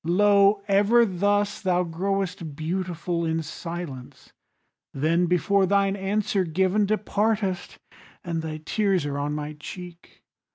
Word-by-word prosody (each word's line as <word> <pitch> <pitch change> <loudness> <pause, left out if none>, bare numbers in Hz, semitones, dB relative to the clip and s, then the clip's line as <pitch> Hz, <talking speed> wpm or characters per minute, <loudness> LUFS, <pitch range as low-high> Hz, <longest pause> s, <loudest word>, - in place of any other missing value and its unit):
Lo! 200 +3 +4
ever 205 +4 +4
thus 205 +2 0
thou 180 -2 +1
growest 180 -2 -3
beautiful 170 +1 -2
In 160 0 -1
silence, 165 -5 -8 0.6
then 165 +5 +2
before 190 +3 +2
thine 200 0 +2
answer 200 0 0
given 190 +5 +1
Departest, 210 -2 -1 0.5
and 165 -2 -2
thy 155 -1 -5
tears 195 -6 +1
are 145 -1 -3
on 145 +1 -2
my 150 0 -4
cheek. 175 +2 -10
185 Hz, 120 wpm, -25 LUFS, 165-200 Hz, 0.6 s, Lo